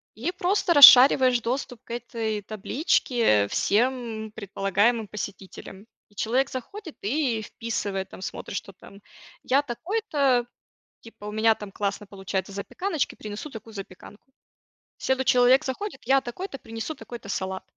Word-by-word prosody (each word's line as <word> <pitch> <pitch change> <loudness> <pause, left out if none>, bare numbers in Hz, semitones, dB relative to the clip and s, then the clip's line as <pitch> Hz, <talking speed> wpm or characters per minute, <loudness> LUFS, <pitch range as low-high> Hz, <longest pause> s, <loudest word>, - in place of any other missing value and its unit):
И 270 +11 -3
просто 365 -1 +1
расшариваешь 260 -3 +9
доступ 245 0 -4
к - - -13
этой 225 -3 -3
табличке 215 - +1
всем 225 - -1
предполагаемым 205 +2 0
посетителям. 200 0 -8 0.2
И 205 - -27
человек 255 +7 0
заходит 325 - -8
и 240 0 0
вписывает, 200 -4 -4
там - - -12
смотрит, 195 - -6
что 195 - -8
там: 200 +2 -16 0.4
"Я 275 +2 +3
такой-то, 285 - 0 0.6
типа, 225 -2 -13
у 210 - -5
меня 220 +1 +3
там 210 -2 -9
классно 200 +1 -3
получается 195 0 -4
запеканочки, 300 - -3
принесу 210 +8 -8
такую 225 -2 -11
запеканку". 200 +6 -11 0.7
Следующий 265 -1 +1
человек 250 +3 +5
заходит: 265 +4 -5
"Я 270 +3 +4
такой-то, 275 +5 -7
принесу 225 +7 -6
такой-то 235 -4 -10
салат". 190 -1 -3
230 Hz, 130 wpm, -25 LUFS, 205-265 Hz, 0.7 s, расшариваешь